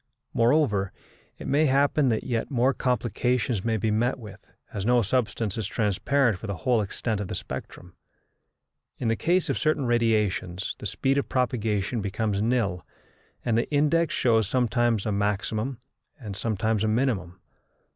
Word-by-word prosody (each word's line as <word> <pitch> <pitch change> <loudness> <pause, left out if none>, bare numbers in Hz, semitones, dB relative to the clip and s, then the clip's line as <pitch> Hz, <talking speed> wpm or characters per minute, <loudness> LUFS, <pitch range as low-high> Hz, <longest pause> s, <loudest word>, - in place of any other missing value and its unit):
Moreover, 115 -6 +2 0.5
it - - -9
may 145 +3 +3
happen 140 +1 +3
that 110 -2 0
yet 120 -3 -2
more 130 0 +2
complications 125 -3 0
may 115 -1 +1
be 110 +1 0
met 120 +5 +1
with, 105 -6 -11 0.3
as 100 - -3
no 120 +2 +3
substance 115 -2 -1
is 105 - -2
transparent 115 +2 +1
for 110 - -7
the 100 - -3
whole 115 +7 +1
extent 105 +1 -2
of 100 - -4
the - - -4
spectrum. 90 -1 -8 1.0
In 120 - -1
the 115 - +2
case 175 +8 +1
of - - -1
certain 155 -3 +1
radiations 105 -6 0
the 105 - -3
speed 135 +7 +1
of - - -4
propagation 115 -4 0
becomes 100 0 -1
nil, 110 -7 0 0.6
and 115 -2 +2
the 115 - 0
index 150 +2 +2
shows 110 -4 +3
sometimes 120 -3 +1
a 105 - 0
maximum 105 +5 -1 0.4
and 105 -6 -7
sometimes 110 0 0
a - - +2
minimum. 110 -6 0
115 Hz, 155 wpm, -26 LUFS, 105-125 Hz, 1.0 s, may